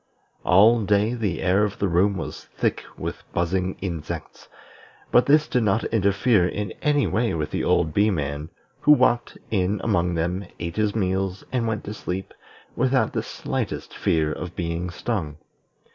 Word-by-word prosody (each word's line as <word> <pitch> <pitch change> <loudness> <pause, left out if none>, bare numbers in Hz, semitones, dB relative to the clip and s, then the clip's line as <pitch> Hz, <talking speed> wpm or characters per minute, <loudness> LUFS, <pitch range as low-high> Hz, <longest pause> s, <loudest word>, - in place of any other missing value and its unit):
All 110 +6 +6
day 105 +3 +2
the 105 -8 -2
air 95 +3 +3
of 105 -1 -1
the 100 - 0
room 95 +3 +2
was 80 - -6
thick - - -2
with - - -5
buzzing 90 +2 0
insects, 85 -5 -6 0.6
but 125 - +5
this 150 +1 +5
did 125 -5 +1
not 105 0 +2
interfere 100 -1 +3
in 100 +1 -3
any 145 -2 +2
way 110 0 0
with 75 -2 -3
the - - -1
old 80 - +2
Bee 105 +2 +4
man, 75 -3 -3 0.3
who 150 - +6
walked 120 -4 +2
in 100 0 +1
among 90 -5 +1
them, 90 +3 -2
ate 85 +1 -5
his 105 -1 +1
meals, 95 -2 -1
and 120 -3 0
went 110 -2 -2
to 105 - -5
sleep, 95 -2 -5 0.4
without 130 +1 +2
the - - 0
slightest - - -4
fear 80 -2 +1
of 90 -1 -7
being 85 0 -2
stung. 85 -6 -3
95 Hz, 165 wpm, -24 LUFS, 90-110 Hz, 0.6 s, All